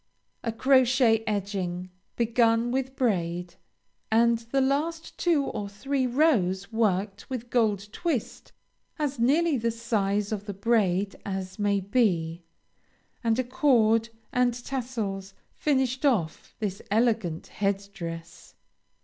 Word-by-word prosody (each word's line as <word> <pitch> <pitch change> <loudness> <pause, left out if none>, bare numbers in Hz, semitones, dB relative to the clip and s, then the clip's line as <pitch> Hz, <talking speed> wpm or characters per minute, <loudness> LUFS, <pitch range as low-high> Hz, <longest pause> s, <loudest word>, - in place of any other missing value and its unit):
A 230 - -1
crochet 255 -2 +4
edging, 185 -3 -2 0.2
begun 230 0 +2
with 265 +1 -2
braid, 175 -8 -1 0.6
and 230 +1 +4
the 235 +4 -1
last 300 +5 -1
two 330 -5 +2
or 205 -5 -4
three 260 +6 -1
rows 225 - +2
worked 200 -2 0
with 245 -2 -5
gold 210 -4 +1
twist 315 - -3 0.5
as 290 -4 -2
nearly 295 +5 +3
the 230 0 0
size 210 -3 -1
of 210 -1 -4
the 205 - -4
braid 200 -2 +1
as 190 +1 -5
may 205 -1 +2
be, 180 -6 +1 0.8
and 225 -1 +2
a 255 - +1
cord 235 -4 +3 0.2
and 250 -1 +2
tassels, 215 -7 -4 0.2
finish 265 -3 0
off 210 - 0
this 205 -3 -3
elegant 215 -6 +1 0.2
head 200 0 0
dress. 165 -1 -8
225 Hz, 120 wpm, -27 LUFS, 195-255 Hz, 0.8 s, crochet